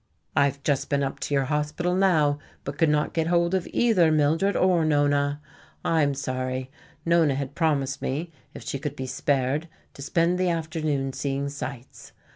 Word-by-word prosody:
"I 140 - +5
have 140 0 -3
just 140 -3 0
been 140 0 +1
up 135 - -3
to - - -3
your 135 - +2
hospital 150 +5 -1
now, 160 -7 +3 0.2
but 140 +1 -6
could 165 -2 +4
not 150 0 +1
get 160 -1 0
hold 170 +1 +2
of 185 -2 0
either 190 -9 +3
Mildred 155 +6 +2
or 180 -3 +3
Nona. 145 -1 +2 0.5
I 165 -1 +3
am 140 -1 +1
sorry. 130 -1 -3 0.3
Nona 165 -4 +3
had 140 0 -4
promised 140 -4 0
me, 155 +6 -3 0.2
if - - -8
she 140 - -4
could 145 0 -4
be 130 - -5
spared, 140 +4 0 0.2
to - - -11
spend 170 +5 +1
the 185 -1 +2
afternoon 155 -5 -1
seeing 140 +1 -2
sights. 135 -2 -8
145 Hz, 180 wpm, -25 LUFS, 140-165 Hz, 0.5 s, I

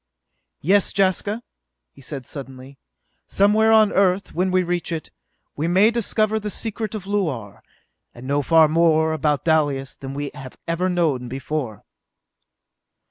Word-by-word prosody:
"Yes, 195 +6 +3
Jaska," 200 +4 +1 0.5
he - - -18
said 135 -1 -6
suddenly, 135 -1 -9 0.5
"somewhere 215 +3 +3
on 220 -2 +5
Earth, 195 0 +1
when 185 +2 0
we 185 0 +2
reach 175 0 -2
it, 160 -2 -5 0.4
we 155 +3 -2
may 190 +6 +4
discover 220 -1 0
the 210 0 -4
secret 220 +1 -4
of 200 -3 -6
Luar 155 - -3 0.5
and 120 - -12
know 140 +2 +1
far 160 +2 +5
more 160 0 +3
about 150 -2 0
Dalis 145 -4 +1
than 135 -1 -8
we 145 0 -4
have 135 -3 -10
ever 170 +3 0
known 155 -9 0
before!" 130 -4 -4
165 Hz, 140 wpm, -22 LUFS, 140-195 Hz, 0.5 s, on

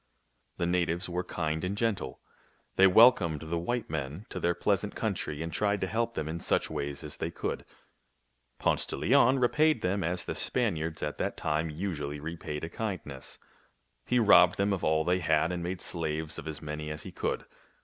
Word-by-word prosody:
The 85 - 0
natives 90 0 0
were 90 +1 -2
kind 80 -3 -2
and 95 +3 -2
gentle. 100 - -1 0.5
They 95 - +7
wel 115 +7 +9
comed 85 - -3
the 85 +1 -2
white 120 +7 -2
men 75 +5 -4
to - - -5
their 85 0 +1
pleasant 100 +3 0
country 85 -8 -2
and 80 -1 -5
tried 100 +3 +1
to - - +2
help 115 +4 -1
them 75 - -2
in 80 +2 -3
such - - 0
ways 70 +1 -4
as 75 -1 -7
they - - -2
could. - - -4 0.9
Ponce - - +1
de - - -3
Leon 130 - +4
repaid 150 +1 +3
them 95 +2 0
as 90 +2 -1
the - - -3
Span 115 -8 0
iards 80 0 -4
at 75 -1 -3
that - - -2
time 80 +2 0
usually 75 -3 -4
repaid 75 -1 -5
a - - -2
kindness, 85 -10 -5 0.4
— - - -44
he 125 - +2
robbed 90 -6 +6
them 100 +1 +2
of 95 - -3
all 80 0 +3
they 90 +1 +2
had 80 0 +2
and 90 -1 -3
made 90 +1 -3
slaves 80 -1 -3
of - - -8
as 80 0 -5
many 75 0 -4
as 75 0 -5
he - - -8
could. - - -2
85 Hz, 200 wpm, -30 LUFS, 80-100 Hz, 0.9 s, wel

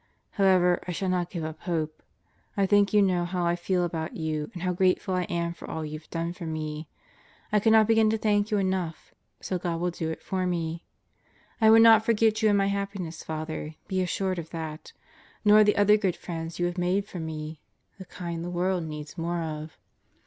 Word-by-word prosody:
However, 185 -3 +4
I 180 - -2
shall 190 +2 -2
not 180 -1 0
give 170 -4 -5
up 155 0 -5
hope.... 160 -3 -3 0.6
I 200 - +3
think 205 +1 +4
you 210 -1 +5
know 180 -2 +2
how 175 0 -2
I 170 0 +2
feel 180 +1 0
about 160 -1 -4
you 155 -2 -2
and 175 - -6
how 180 -1 0
grateful 185 +1 +1
I 180 -1 0
am 170 0 -2
for - - -11
all 160 -1 -4
you've 155 +1 -8
done 170 +1 -3
for 175 -2 -7
me. 155 -1 -4 0.6
I 210 - +4
cannot 220 +1 +5
begin 225 0 +4
to 220 - +1
thank 210 -1 +1
you 210 - +1
enough, 185 -4 -2 0.3
so 185 - -2
God 170 -2 -2
will 175 +1 0
do 165 -1 -3
it 160 - -6
for 185 -1 -1
me, 170 -1 -3 0.8
I 220 - +7
will 225 +1 +8
not 225 -1 +7
forget 220 -1 +2
you 215 - +4
in 205 - +4
my 195 - +3
happiness, 200 -4 -3
Father; 155 0 -5
be 190 -1 0
assured 185 0 -1
of 165 -1 -7
that. 160 -2 -6 0.5
Nor 210 +1 +8
the 210 0 +3
other 205 +1 +5
good 190 -5 0
friends 165 -1 -6
you 175 - 0
have 175 +1 -2
made 185 +3 +1
for 190 -3 -8
me... 155 -1 -6 0.4
the 190 - -8
kind 170 -1 -6
the 175 - -4
world 180 0 0
needs 150 +1 -7
more 170 0 -1
of. 155 0 -6
175 Hz, 210 wpm, -27 LUFS, 165-195 Hz, 0.8 s, will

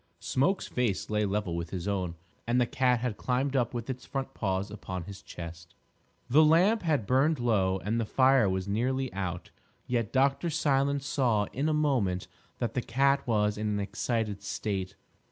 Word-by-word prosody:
Smoke's 175 +9 +1
face 115 -5 -1
lay 105 0 +2
level 100 -3 -1
with 85 -1 -4
his 90 +1 -4
own; 95 -4 -1 0.3
and 120 +1 +2
the 125 - +4
cat 125 0 +1
had 125 -4 -2
climbed 130 +2 -1
up 120 -2 +1
with 120 -1 -4
its 130 -1 -5
front 135 -1 -4
paws 95 0 -2
upon 95 -4 -5
his 100 +2 -9
chest. 85 0 -9 0.5
The 145 +6 +6
lamp 180 +9 +4
had 150 - +1
burned 135 +7 +3
low 100 -6 +2
and 110 +4 -2
the - - -1
fire 130 -2 +4
was 95 0 -2
nearly 130 +5 -1
out, 90 -2 -4 0.3
yet 120 -4 -1
Dr. 140 +5 +2
Silence 140 -3 +1
saw 120 -7 +2
in 145 +5 0
a - - +2
moment 120 -12 +1 0.3
that 115 -2 -2
the 125 - 0
cat 140 +3 +1
was 105 -2 +1
in 105 - -1
an 105 -1 0
excited 105 0 -2
state. 100 -2 -3
115 Hz, 180 wpm, -29 LUFS, 100-135 Hz, 0.5 s, The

